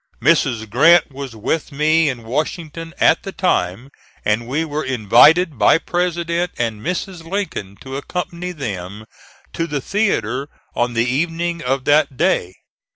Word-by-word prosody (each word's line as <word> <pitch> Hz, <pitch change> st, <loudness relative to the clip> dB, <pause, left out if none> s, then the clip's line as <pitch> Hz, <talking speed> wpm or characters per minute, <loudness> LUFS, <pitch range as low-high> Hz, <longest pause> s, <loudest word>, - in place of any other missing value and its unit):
Mrs. 130 Hz, -9 st, +2 dB
Grant 155 Hz, +9 st, +5 dB
was 135 Hz, -3 st, -7 dB
with 150 Hz, +10 st, -2 dB
me 155 Hz, +2 st, +3 dB
in 120 Hz, -3 st, -5 dB
Washington 160 Hz, +6 st, -4 dB
at -, -, +4 dB
the 195 Hz, -, -6 dB
time, 120 Hz, -, -1 dB, 0.3 s
and 110 Hz, +2 st, 0 dB
we 150 Hz, +6 st, -1 dB
were 155 Hz, 0 st, -3 dB
invited 130 Hz, -, +4 dB
by -, -, +6 dB
President 175 Hz, 0 st, -1 dB
and 115 Hz, -3 st, -2 dB
Mrs. 180 Hz, -, -4 dB
Lincoln 165 Hz, -, -4 dB
to 135 Hz, 0 st, -6 dB
accompany 180 Hz, +3 st, -4 dB
them 105 Hz, -, -6 dB, 0.5 s
to 165 Hz, -, -2 dB
the 145 Hz, -3 st, -2 dB
theatre 140 Hz, -, -1 dB, 0.3 s
on 120 Hz, 0 st, 0 dB
the 115 Hz, +1 st, +2 dB
evening 165 Hz, +5 st, -1 dB
of 130 Hz, +1 st, -1 dB
that 145 Hz, -2 st, +3 dB
day. 160 Hz, -, +1 dB
150 Hz, 145 wpm, -19 LUFS, 120-170 Hz, 0.5 s, by